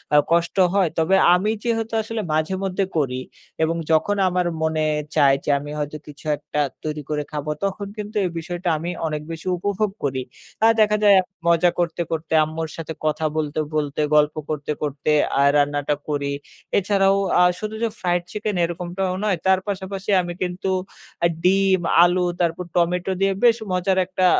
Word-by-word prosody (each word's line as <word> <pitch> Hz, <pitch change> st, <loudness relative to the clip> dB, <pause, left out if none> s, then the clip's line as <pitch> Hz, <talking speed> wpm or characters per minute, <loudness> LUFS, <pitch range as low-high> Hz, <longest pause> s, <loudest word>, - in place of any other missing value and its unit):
আ -, -, +8 dB
কষ্ট 170 Hz, 0 st, +2 dB, 0.2 s
হয়। 195 Hz, -3 st, +3 dB
তবে 165 Hz, +4 st, +3 dB, 0.2 s
আমি 185 Hz, +4 st, +2 dB
যেহেতু 225 Hz, -1 st, -1 dB
আসলে 225 Hz, +1 st, -4 dB
মাঝেমধ্যে 190 Hz, +5 st, 0 dB
করি 130 Hz, -4 st, 0 dB, 0.4 s
এবং 165 Hz, +1 st, +1 dB, 0.2 s
যখন 160 Hz, +6 st, +3 dB
আমার 180 Hz, 0 st, 0 dB, 0.2 s
মনে 160 Hz, 0 st, 0 dB, 0.3 s
চায় 135 Hz, -1 st, +5 dB
যে, -, -, -4 dB
আমি 145 Hz, +1 st, -8 dB
হয়তো 150 Hz, +1 st, -3 dB
কিছু 150 Hz, +1 st, -13 dB
একটা 150 Hz, -, -5 dB, 0.2 s
তৈরি 155 Hz, -1 st, -3 dB
করে 150 Hz, -1 st, -1 dB
খাবো। 150 Hz, 0 st, -4 dB
তখন 200 Hz, +1 st, -2 dB
কিন্তু 210 Hz, +1 st, -6 dB
এই -, -, 0 dB
বিষয়টা 175 Hz, +1 st, -3 dB
আমি 165 Hz, +3 st, -4 dB, 0.2 s
অনেক 150 Hz, -1 st, -3 dB
বেশি 165 Hz, +2 st, -7 dB
উপভোগ 205 Hz, +3 st, -1 dB
করি। 135 Hz, -2 st, -1 dB, 0.4 s
আর 225 Hz, -, +7 dB
দেখা 210 Hz, 0 st, +4 dB
যায় 205 Hz, -1 st, +7 dB, 0.3 s
মজা 170 Hz, +1 st, +4 dB
করতে, 170 Hz, -1 st, 0 dB
করতে 160 Hz, 0 st, -3 dB
আম্মুর 160 Hz, +1 st, -4 dB
সাথে 160 Hz, -1 st, -5 dB
কথা 155 Hz, +1 st, 0 dB
বলতে, 155 Hz, -1 st, -1 dB, 0.2 s
বলতে 150 Hz, -1 st, -1 dB
গল্প 150 Hz, 0 st, +4 dB
করতে, 150 Hz, -1 st, -3 dB
করতে 145 Hz, 0 st, -1 dB, 0.3 s
আ -, -, +5 dB
রান্নাটা 145 Hz, 0 st, +1 dB
করি। 145 Hz, -1 st, -1 dB, 0.5 s
এছাড়াও 195 Hz, 0 st, +3 dB, 0.2 s
আ -, -, +6 dB, 0.2 s
শুধু 215 Hz, +1 st, -4 dB
যে, -, -, +3 dB
fried 175 Hz, -1 st, 0 dB
chicken 210 Hz, -1 st, -3 dB
এরকমটাও 175 Hz, +2 st, -2 dB
নয় 205 Hz, -4 st, +1 dB
তার 190 Hz, 0 st, +4 dB
পাশাপাশি 195 Hz, 0 st, -4 dB
আমি 175 Hz, -1 st, -5 dB
কিন্তু 180 Hz, +1 st, -4 dB, 0.6 s
আ -, -, +7 dB, 0.2 s
ডিম, 190 Hz, +1 st, +4 dB, 0.2 s
আলু 175 Hz, +1 st, +3 dB, 0.2 s
তারপর 170 Hz, +1 st, 0 dB
টমেটো 180 Hz, +2 st, +1 dB
দিয়ে 195 Hz, 0 st, +3 dB
বেশ 235 Hz, -2 st, +6 dB, 0.2 s
মজার 185 Hz, +1 st, +1 dB
একটা 185 Hz, 0 st, 0 dB
175 Hz, 170 wpm, -22 LUFS, 155-195 Hz, 0.6 s, আ